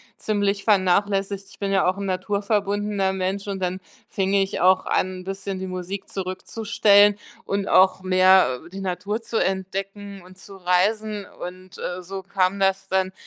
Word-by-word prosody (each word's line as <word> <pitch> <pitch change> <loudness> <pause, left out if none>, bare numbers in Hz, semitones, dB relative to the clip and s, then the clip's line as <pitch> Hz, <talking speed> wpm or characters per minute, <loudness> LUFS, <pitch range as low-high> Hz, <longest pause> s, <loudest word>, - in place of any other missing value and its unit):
ziemlich 200 -2 -1
vernachlässigt. 195 0 +1
Ich - - -16
bin 200 -1 -2
ja 195 -2 +3
auch 185 - -2
'n 200 - -4
naturverbundener 200 +1 -1
Mensch 190 +1 -3
und 195 -1 -3
dann 180 +1 -2 0.3
fing 195 0 -1
ich 195 0 0
auch 185 +1 +4
an, 185 0 -1
'n - - -12
bisschen 195 0 -5
die 190 - -5
Musik 185 +1 -5
zurückzustellen 205 +2 +2 0.3
und 200 0 -2
auch 190 0 +4
mehr, 185 -7 +4
äh, 170 - -13
die 190 +2 -8
Natur 195 +4 -3
zu 230 - -3
entdecken 195 +1 -4
und 180 +1 -16
zu 195 +1 -12
reisen. 200 +3 0 0.2
Und, 185 +1 -9
äh, 180 +1 -4
so 190 +2 -6
kam 190 0 0
das 195 0 +1
dann, 190 0 0
195 Hz, 165 wpm, -23 LUFS, 185-200 Hz, 0.3 s, auch